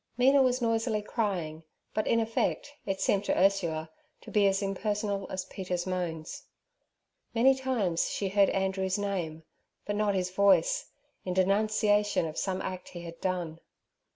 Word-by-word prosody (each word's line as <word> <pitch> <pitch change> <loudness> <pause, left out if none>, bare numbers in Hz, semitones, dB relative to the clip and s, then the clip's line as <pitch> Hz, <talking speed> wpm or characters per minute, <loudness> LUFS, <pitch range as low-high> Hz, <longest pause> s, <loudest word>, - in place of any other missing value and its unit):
Mina 270 +3 +5
was 255 -1 +2
noisily 225 -2 0
crying, 180 -9 -2 0.3
but, 215 - -1
in 230 - +3
effect, 230 +5 -1
it 195 -1 -1
seemed 200 0 +2
to - - +1
Ursula 170 -5 +1 0.3
to - - -11
be 205 -2 +4
as 195 +1 +1
impersonal 205 0 -2
as 190 -1 -3
Peter's 180 -2 -4
moans. 175 -4 -3 0.9
Many 255 +4 +6
times 245 -10 0
she 195 - -2
heard 200 0 +4
Andrew's 190 0 0
name, 180 -6 -3 0.4
but 205 - -2
not 205 -1 +1
his 185 -1 -1
voice, 200 - +3 0.4
in 180 -1 -3
denunciation 205 +1 +2
of 155 -1 -5
some 190 +1 -2
act 185 -1 -5
he 175 - -8
had 170 0 -9
done. 175 -3 -2
195 Hz, 155 wpm, -29 LUFS, 180-215 Hz, 0.9 s, Many